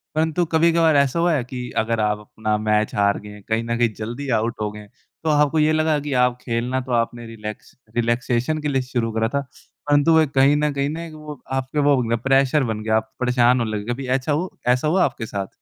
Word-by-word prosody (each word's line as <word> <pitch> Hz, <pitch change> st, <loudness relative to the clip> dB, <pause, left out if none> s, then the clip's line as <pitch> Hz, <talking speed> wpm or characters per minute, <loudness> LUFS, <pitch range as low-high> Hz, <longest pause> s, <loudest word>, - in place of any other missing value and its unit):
परंतु 160 Hz, +2 st, +1 dB
कभी-कभार 165 Hz, 0 st, +3 dB
ऐसा 140 Hz, +2 st, +2 dB
हुआ 170 Hz, 0 st, +3 dB
है 140 Hz, -5 st, 0 dB
कि 125 Hz, 0 st, -6 dB
अगर 115 Hz, +1 st, 0 dB
आप 105 Hz, -1 st, +1 dB
अपना 105 Hz, 0 st, -3 dB
मैच 105 Hz, 0 st, 0 dB
हार 100 Hz, 0 st, +2 dB
गए 105 Hz, 0 st, -11 dB
कहीं 110 Hz, +1 st, +1 dB
न 115 Hz, 0 st, -2 dB
कहीं 120 Hz, -1 st, +3 dB
जल्दी 120 Hz, +6 st, -6 dB
आउट 115 Hz, +2 st, -1 dB
हो 105 Hz, -1 st, -1 dB
गए, 105 Hz, 0 st, -11 dB
तो 130 Hz, +7 st, -9 dB
आपको 150 Hz, +1 st, +3 dB
ये 155 Hz, +1 st, +3 dB
लगा 155 Hz, -1 st, +2 dB
कि 145 Hz, -1 st, -4 dB
आप 125 Hz, 0 st, +1 dB
खेलना 120 Hz, +2 st, -2 dB
तो 130 Hz, 0 st, -8 dB
आपने 120 Hz, 0 st, -1 dB
रिलैक्स 110 Hz, -2 st, -8 dB, 0.2 s
रिलैक्सेशन 120 Hz, +4 st, 0 dB
के 150 Hz, -, -2 dB
लिए 135 Hz, -2 st, +1 dB
शुरू 120 Hz, -3 st, -2 dB
करा 110 Hz, 0 st, 0 dB
था 140 Hz, -, +1 dB, 0.5 s
परंतु 145 Hz, +2 st, +4 dB
वो 160 Hz, -, +6 dB
एक 150 Hz, -3 st, 0 dB
कहीं 135 Hz, +2 st, +5 dB
न 150 Hz, 0 st, +1 dB
कहीं 140 Hz, 0 st, -1 dB
ना 165 Hz, +2 st, -5 dB
वो 150 Hz, -3 st, -9 dB
आपके 135 Hz, +2 st, -2 dB
वो 145 Hz, 0 st, +4 dB
बन 120 Hz, -, -3 dB
गया 115 Hz, -, +2 dB
प्रेशर 135 Hz, +2 st, +3 dB
बन 110 Hz, -3 st, -3 dB
गया 110 Hz, 0 st, +1 dB
आप 110 Hz, 0 st, -4 dB
परेशान 125 Hz, 0 st, +3 dB
होने 115 Hz, -2 st, -1 dB
लगे, 105 Hz, +4 st, -3 dB
कभी 130 Hz, +1 st, -6 dB
ऐसा 130 Hz, +3 st, 0 dB
हो 165 Hz, +6 st, -2 dB
ऐसा 125 Hz, +4 st, +2 dB
हुआ 180 Hz, +4 st, +3 dB
आपके 120 Hz, -3 st, -4 dB
साथ? 100 Hz, -3 st, -4 dB
125 Hz, 235 wpm, -22 LUFS, 115-150 Hz, 0.5 s, वो